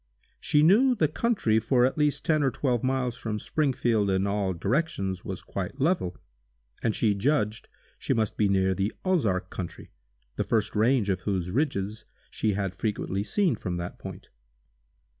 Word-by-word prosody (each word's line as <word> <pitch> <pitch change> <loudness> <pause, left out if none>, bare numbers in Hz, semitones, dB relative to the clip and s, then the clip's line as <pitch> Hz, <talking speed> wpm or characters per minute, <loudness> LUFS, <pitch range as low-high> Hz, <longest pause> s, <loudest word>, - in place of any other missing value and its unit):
She 150 0 +3
knew 240 +10 +5
the 160 -8 +2
country 155 - +1
for 120 +2 +3
at 130 - 0
least 150 0 0
ten 155 -3 +3
or 135 - +3
twelve 125 -3 -1
miles 130 -2 0
from 110 -3 -3
Springfield 120 -6 +1
in 95 0 +1
all 100 -1 0
directions 95 - -1
was 95 -2 -6
quite 100 +8 -5
level, 140 - +1 0.6
and 110 - 0
she 110 -3 +2
judged 110 0 0 0.3
she - - -3
must 110 -3 +1
be 105 -2 +2
near 95 -1 +2
the 100 +3 -1
Ozark 105 - +1
country, 90 -3 -7 0.5
the - - +1
first 110 -2 0
range 110 0 +3
of 95 - -1
whose 90 -3 -2
ridges 110 -5 -1 0.3
she 110 -2 0
had 95 -2 -2
frequently 100 -1 -2
seen 180 - +1
from 90 -4 -4
that 85 0 -5
point. - - -9
110 Hz, 165 wpm, -27 LUFS, 95-140 Hz, 0.6 s, knew